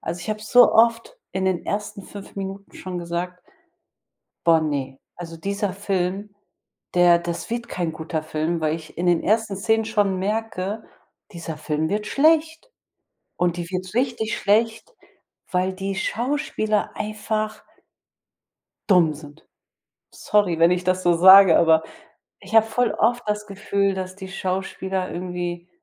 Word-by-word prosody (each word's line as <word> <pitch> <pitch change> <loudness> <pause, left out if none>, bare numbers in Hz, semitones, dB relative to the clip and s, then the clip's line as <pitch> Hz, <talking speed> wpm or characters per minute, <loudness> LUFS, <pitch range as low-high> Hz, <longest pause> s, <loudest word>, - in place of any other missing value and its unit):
Also, 170 +2 -4
ich 180 - -8
habe 215 0 -3
so 245 +3 +6
oft 230 - +3 0.2
in 190 0 -2
den 185 -2 0
ersten 210 0 -4
5 200 +1 -11
Minuten 195 0 -7
schon 185 -1 -6
gesagt: 175 +1 -4 1.1
„Boah, 165 -1 +6
ne. 140 -4 -3 0.2
Also, 165 -1 -8
dieser 200 +3 -2
Film, 195 +1 -2 0.6
der 175 -1 +6
das 170 +3 -5
wird 235 0 -3
kein 175 -6 -3
guter 160 0 -4
Film“, 155 +2 -2
weil 155 0 0
ich 160 -1 -13
in 175 +1 -2
den 175 -2 +2
ersten 215 -1 +1
Szenen 220 +2 +1
schon 205 -4 0
merke: 210 0 -3 0.5
„Dieser 170 -3 -6
Film 155 +1 -2
wird 210 +3 -2
schlecht“, 320 - +2 0.7
und 175 -1 0
die 170 -1 -5
wird 185 0 -5
richtig 230 -2 -1
schlecht, 225 - 0 0.6
weil 185 +1 0
die 195 +1 -4
Schauspieler 215 -1 -1
einfach 215 0 -3 1.3
dumm 170 -5 +4
sind. 150 +1 -13 0.7
Sorry, 200 -6 +1
wenn 170 +1 +5
ich 180 0 0
das 185 0 +1
so 175 -1 +3
sage, 190 0 +8
aber 160 -1 +4 0.6
ich 195 +2 -10
habe 220 0 +6
voll 235 0 0
oft 245 +1 +1
das 210 0 -2
Gefühl, 200 -1 -1
dass 185 -1 -5
die 190 -1 -8
Schauspieler 190 0 -3
irgendwie 175 -1 -5
190 Hz, 145 wpm, -23 LUFS, 175-215 Hz, 1.3 s, sage